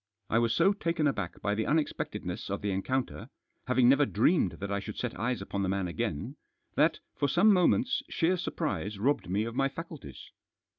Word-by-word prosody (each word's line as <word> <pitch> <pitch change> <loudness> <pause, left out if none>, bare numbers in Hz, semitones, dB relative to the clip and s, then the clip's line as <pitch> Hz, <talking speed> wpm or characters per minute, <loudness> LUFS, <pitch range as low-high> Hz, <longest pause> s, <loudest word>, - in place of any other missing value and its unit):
I 115 - +4
was 115 -1 +2
so 190 +4 +4
taken 165 -5 -1
aback 105 -11 -1
by 100 - +1
the 110 +1 -1
unexpectedness 155 0 -2
of - - -3
the 100 - 0
encounter 120 +3 -2 0.2
— - - -43
having 125 -1 +4
never 140 +2 +5
dreamed 155 - +2
that 100 +4 -6
I 100 - 0
should 105 +1 -7
set 125 -2 -3
eyes 125 +2 -1
upon 100 - -3
the 95 - 0
man 95 -1 0
again 75 -3 -3 0.2
— - - -45
that, - - +3 0.2
for 145 - +1
some 195 +9 +5
moments, 245 +9 +3
sheer 170 +3 +2
surprise 155 - -3
robbed 130 -2 0
me 100 +3 +1
of 115 +1 -4
my 135 +2 +1
faculties. 160 - -9
125 Hz, 200 wpm, -30 LUFS, 100-160 Hz, 0.2 s, never